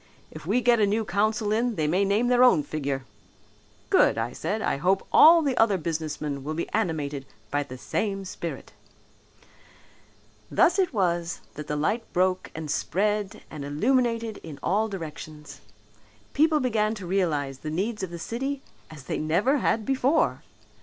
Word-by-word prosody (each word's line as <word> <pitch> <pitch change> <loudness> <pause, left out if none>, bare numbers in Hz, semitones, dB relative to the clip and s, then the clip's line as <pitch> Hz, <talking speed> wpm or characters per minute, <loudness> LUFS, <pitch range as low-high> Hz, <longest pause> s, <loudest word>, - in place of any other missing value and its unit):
If - - -10
we 230 +6 +2
get 235 -1 +4
a 205 - +4
new 215 +2 0
council 210 +3 0
in 230 +2 +1
they 155 - 0
may 180 +6 +2
name 200 +4 +2
their 250 0 +4
own 205 -12 +5
figure.' 140 -3 -3 0.9
'Good,' - - +4
I 115 +2 -2
said. 210 +10 -2
'I 220 - -1
hope 190 +6 +1
all 330 +1 +8
the 275 -3 0
other 215 -4 +4
businessmen 155 -4 -3
will 155 +2 -4
be 170 - -2
animated 150 -9 -2 0.3
with 145 0 0
the 130 - -8
same 195 - -2
spirit.'" 170 -2 -6 1.8
Thus 355 +3 +3
it 370 -3 +2
was 175 - -1
that 150 0 -8
the 150 - -2
light 210 +10 -1
broke 185 +1 +1
and 155 -2 -4
spread 205 0 -1
and 150 -2 -6
illuminated 230 - 0
in 155 -4 -9
all 215 +3 +1
directions. 155 -4 -8 0.7
People 310 +1 +3
began 220 -4 0
to 195 -3 -8
realize 155 -8 -1
the 155 - -5
needs 200 +8 -2
of 190 - -3
the 170 - -7
city 270 +9 -4 0.3
as 155 -4 -11
they - - -3
never 190 - +2
had 220 -2 0
before. 270 - +1
195 Hz, 165 wpm, -26 LUFS, 155-225 Hz, 1.8 s, all